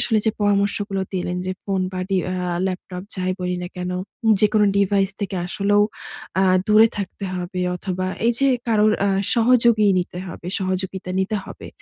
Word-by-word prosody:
আসলে 220 Hz, -2 st, +2 dB
যে -, -, +5 dB
পরামর্শগুলো 200 Hz, -1 st, +1 dB
দিলেন 180 Hz, -1 st, -2 dB
যে 185 Hz, -, -1 dB
ফোন 195 Hz, -1 st, -1 dB
বা, 185 Hz, -, -3 dB
ডি 195 Hz, -, +2 dB, 0.2 s
আ -, -, -2 dB, 0.3 s
ল্যাপটপ, 180 Hz, -1 st, -5 dB
যাই 185 Hz, 0 st, -1 dB
বলি 180 Hz, 0 st, -1 dB
না 175 Hz, -, -4 dB
কেন? 180 Hz, 0 st, -3 dB, 0.5 s
যেকোনো 210 Hz, 0 st, +4 dB
ডিভাইস 195 Hz, -1 st, +2 dB
থেকে 195 Hz, -1 st, -3 dB
আসলেও 205 Hz, +2 st, +2 dB, 0.6 s
আ -, -, +4 dB, 0.2 s
দূরে 215 Hz, +2 st, +7 dB
থাকতে 195 Hz, +1 st, -5 dB
হবে 180 Hz, 0 st, -4 dB, 0.2 s
অথবা, 185 Hz, 0 st, -3 dB, 0.2 s
এইযে 240 Hz, +4 st, +3 dB, 0.2 s
কারোর 215 Hz, -1 st, +4 dB
আ -, -, +2 dB, 0.3 s
সহযোগী 235 Hz, -2 st, +4 dB
নিতে 180 Hz, 0 st, -4 dB
হবে 175 Hz, 0 st, -9 dB
সহযোগিতা 185 Hz, 0 st, -3 dB
নিতে 205 Hz, +3 st, -1 dB
হবে। -, -, -10 dB
195 Hz, 165 wpm, -22 LUFS, 185-210 Hz, 0.6 s, দূরে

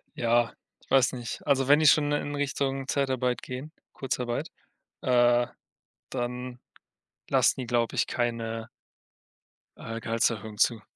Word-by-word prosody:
Ja, 120 Hz, 0 st, +2 dB, 0.3 s
ich -, -, -26 dB
weiß 135 Hz, -2 st, +4 dB
nicht. 120 Hz, -2 st, -6 dB
Also 135 Hz, -2 st, +2 dB
wenn 145 Hz, +1 st, +7 dB
die 155 Hz, -, +4 dB
schon 145 Hz, 0 st, +5 dB
in, 145 Hz, 0 st, -1 dB
Richtung 135 Hz, -1 st, -1 dB
Zeitarbeit 130 Hz, -3 st, 0 dB
gehen, 130 Hz, +5 st, -7 dB, 0.2 s
Kurzarbeit, 125 Hz, -3 st, -3 dB, 0.5 s
äh, 120 Hz, -1 st, +4 dB, 0.6 s
dann 125 Hz, +1 st, -4 dB, 0.7 s
lassen -, -, +3 dB
die, -, -, -4 dB
glaube 120 Hz, -1 st, 0 dB
ich, -, -, +1 dB
keine 115 Hz, -2 st, -2 dB, 1.1 s
äh, 115 Hz, 0 st, -6 dB
Gehaltserhöhung 110 Hz, -2 st, -1 dB
zu. 115 Hz, 0 st, +2 dB
125 Hz, 125 wpm, -27 LUFS, 120-135 Hz, 1.1 s, wenn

